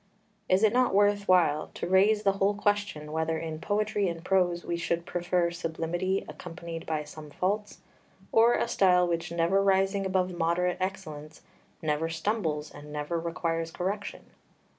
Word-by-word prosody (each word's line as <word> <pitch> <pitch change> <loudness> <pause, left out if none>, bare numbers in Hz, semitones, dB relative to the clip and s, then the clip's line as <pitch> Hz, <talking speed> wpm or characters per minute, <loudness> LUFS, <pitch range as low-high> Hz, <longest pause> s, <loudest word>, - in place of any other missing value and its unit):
Is 185 +3 +3
it 215 0 +5
not 250 -5 +3
worth 205 0 +3
while 170 -5 +3
to - - -4
raise 205 +3 +4
the 200 - +4
whole 195 +1 +1
question 205 -7 -1
whether 160 +1 -1
in 160 -1 -5
poetry 205 0 0
and 170 0 -7
prose 180 -2 +1
we 170 - -1
should 170 0 -2
prefer 175 0 0
sublimity 175 +3 -2
accompanied 170 -1 -8
by 155 -1 -1
some 150 0 -11
faults, 205 +7 -2 0.5
or 230 +2 +5
a - - 0
style 180 -5 +4
which 170 -1 -2
never 170 +4 +2
rising 195 0 +2
above 185 -1 0
moderate 175 +2 +1
excellence 160 -5 -5 0.4
never 155 +1 0
stumbles 165 -4 -2
and 150 0 -11
never 150 +3 -2
requires 165 0 -2
correction? 195 +5 -4
175 Hz, 155 wpm, -28 LUFS, 165-195 Hz, 0.5 s, it